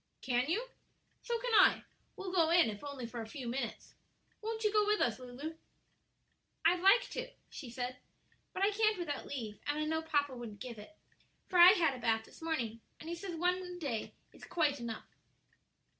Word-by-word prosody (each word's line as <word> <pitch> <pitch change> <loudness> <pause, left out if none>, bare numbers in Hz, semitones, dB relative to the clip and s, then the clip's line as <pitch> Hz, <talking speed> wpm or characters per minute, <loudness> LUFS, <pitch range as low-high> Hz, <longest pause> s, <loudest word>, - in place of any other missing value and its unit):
"Can 250 +1 +1
you? 455 +9 0 0.5
So 475 -1 -1
can 485 0 -3
I; - - +6 0.3
we'll 385 -2 -5
go 335 -3 +3
in 335 -9 +5
if 205 - -9
only 280 -4 -5
for 235 0 -6
a 220 - -7
few 250 +2 -7
minutes. 235 -1 -4 0.5
Won't 445 +1 -3
you 425 -1 +2
go 425 -1 +5
with 420 0 +3
us, 235 0 +1
Lulu?" 255 +5 -6 1.1
"I'd 360 - +5
like 390 +6 +6
to," - - -4 0.2
she 265 - -8
said, 250 +1 -4 0.5
"but 380 - -2
I 405 - +4
can't 430 0 +2
without 305 -5 -4
leave; 220 -7 -5
and 290 +1 0
I 305 - 0
know 320 +1 0
papa 290 -4 0
wouldn't 230 -4 -8
give 240 -2 -7
it, 265 +10 -13 0.5
for 360 - +1
I 355 +2 +11
had 330 -8 +2
a 255 - -7
bath 225 -2 +1
this - - -16
morning, 235 -9 -2 0.2
and 320 - -8
he 340 - -2
says 350 0 -6
one 360 +2 +2
a 360 -1 -7
day 275 -10 -3 0.2
is - - -16
quite 300 -5 +1
enough." 230 -2 -5
305 Hz, 200 wpm, -34 LUFS, 245-360 Hz, 1.1 s, I